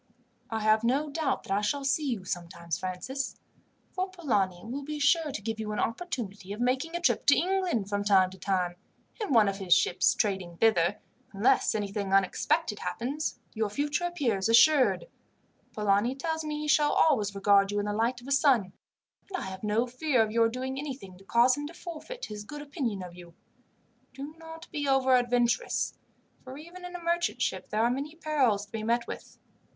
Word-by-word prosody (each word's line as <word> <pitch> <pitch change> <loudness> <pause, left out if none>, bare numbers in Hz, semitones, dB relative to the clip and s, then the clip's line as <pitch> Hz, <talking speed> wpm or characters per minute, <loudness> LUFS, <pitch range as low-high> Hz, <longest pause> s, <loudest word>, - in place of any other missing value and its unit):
"I 225 -1 -2
have 215 +1 +3
no 280 +5 +1
doubt 315 0 -1
that - - -9
I 205 - +1
shall 275 +7 -1
see 280 +1 +1
you 210 -7 -3
sometimes, 170 -2 -4
Francis; 220 +9 -4 0.5
for 370 +1 -2
Polani 205 - -1
will 255 +5 -4
be 300 +2 -5
sure 295 +1 +3
to 210 - -5
give 225 0 -3
you 215 -1 -3
an - - -3
opportunity 215 - -3
of 210 - -8
making 260 +7 0
a - - 0
trip 345 - +1
to 285 - +7
England, 360 - 0
from 205 0 -1
time 190 -2 +4
to 190 - -13
time, 180 -2 -1 0.4
in 420 - -2
one 225 -5 +6
of 195 0 -1
his 190 -3 +4
ships 180 0 +2
trading 190 -5 -1
thither. 195 -3 +3 0.4
Unless 200 +3 +3
anything 200 -1 -2
unexpected 205 - +1
happens, 280 +6 -3 0.2
your 220 -2 -1
future 295 - -1
appears 240 - 0
assured. 280 - +5 0.7
Polani 210 +4 +1
tells 320 +3 -2
me 300 -1 -3
he 300 - -3
shall 295 -1 +4
always 215 -10 +3
regard 200 0 +4
you 205 - -2
in 205 - 0
the 205 - -2
light 235 +3 0
of 245 - -13
a - - -5
son; 260 - +3 0.6
and 375 - -2
I - - -4
have 190 +1 -7
no 215 +3 +1
fear 255 -1 +1
of 215 - -3
your 230 0 +3
doing 260 +3 -4
anything 265 -10 -7
to - - -16
cause 235 +5 +4
him 290 0 -5
to 335 - -11
forfeit 360 +10 -7
his 210 -1 -7
good 295 +7 -8
opinion 255 - -3
of 180 -1 -9
you. 175 -1 -13 0.8
Do 280 +3 -7
not 325 0 -10
be 290 -2 -2
over 265 -1 +4
adventurous, 245 -1 +1 0.5
for 260 +1 -9
even 345 +4 -10
in 355 0 -8
a - - -4
merchant 340 +1 0
ship - - -2
there 215 +1 +1
are 235 - +3
many 285 +5 -4
perils 270 -11 +1
to 205 - -29
be 225 - -4
met 235 +2 +1
with. - - -9
240 Hz, 200 wpm, -29 LUFS, 205-295 Hz, 0.8 s, to